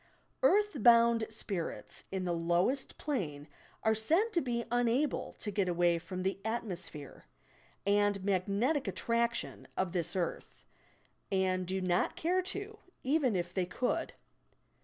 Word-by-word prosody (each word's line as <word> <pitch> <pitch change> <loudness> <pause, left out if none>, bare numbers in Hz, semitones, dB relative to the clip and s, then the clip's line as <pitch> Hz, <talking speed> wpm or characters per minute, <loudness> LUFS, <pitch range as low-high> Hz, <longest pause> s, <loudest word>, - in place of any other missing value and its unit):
"Earth 415 - +3
bound 235 0 +6
spirits" 195 -5 -4
in 190 -1 -2
the 175 - 0
lowest 175 +11 0
plane 160 - -3 0.4
are 220 - +4
said 330 - +2
to 340 - +3
be 235 -2 -2
unable 245 +4 +1
to 210 - -3
get 200 -3 0
away 175 -1 +2
from 185 +2 -5
the 190 +1 -1
"atmosphere" 185 -10 -4 0.6
and 205 -1 +2
"magnetic 200 - +1
attraction" 235 +4 -1
of 185 -2 0
this 175 0 -1
earth, 175 -3 -4 0.7
and 185 -1 +1
do 190 +1 -1
not 180 -1 +1
care 360 +3 +1
to, 405 +3 -5 0.2
even 265 -5 +2
if 175 0 -2
they 185 -2 0
could. 250 +7 -1
205 Hz, 135 wpm, -32 LUFS, 185-250 Hz, 0.7 s, bound